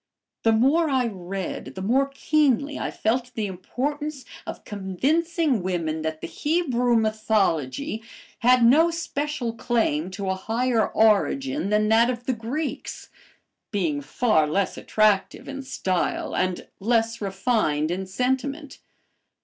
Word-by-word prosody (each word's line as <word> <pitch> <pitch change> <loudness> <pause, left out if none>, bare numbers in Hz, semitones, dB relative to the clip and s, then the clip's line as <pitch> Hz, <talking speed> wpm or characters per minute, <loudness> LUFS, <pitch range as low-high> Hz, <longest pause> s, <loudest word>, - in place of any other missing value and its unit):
The 225 - +3
more 280 +9 +3
I 260 -2 +2
read, 190 -3 -5
the 190 - -5
more 260 +7 +2
keenly 280 0 +1
I - - -2
felt 245 +3 -1
the 220 - -1
importance 275 +10 -4 0.2
of - - -6
convincing 275 - 0
women 165 -4 -2
that 160 0 -3
the - - -4
Hebrew 260 -7 +1
mythology 215 - 0 0.4
had 250 0 +5
no 310 +8 +6
special 300 -7 -3
claim 220 -9 0
to 195 +1 -5
a 190 - +1
higher 225 +3 0
origin 245 +5 +2
than 210 0 +2
that 230 +2 +5
of 245 -1 -4
the 260 - +1
Greeks, 250 +7 -4 0.6
being 165 -8 -1
far 155 - +2
less 195 +6 0
attractive 215 -2 +1
in 275 0 -5
style 190 -9 -2
and 185 -1 -1
less 230 +2 +1
refined 195 -6 0
in 190 +2 -3
sentiment. 265 +7 -2
230 Hz, 130 wpm, -24 LUFS, 190-270 Hz, 0.6 s, no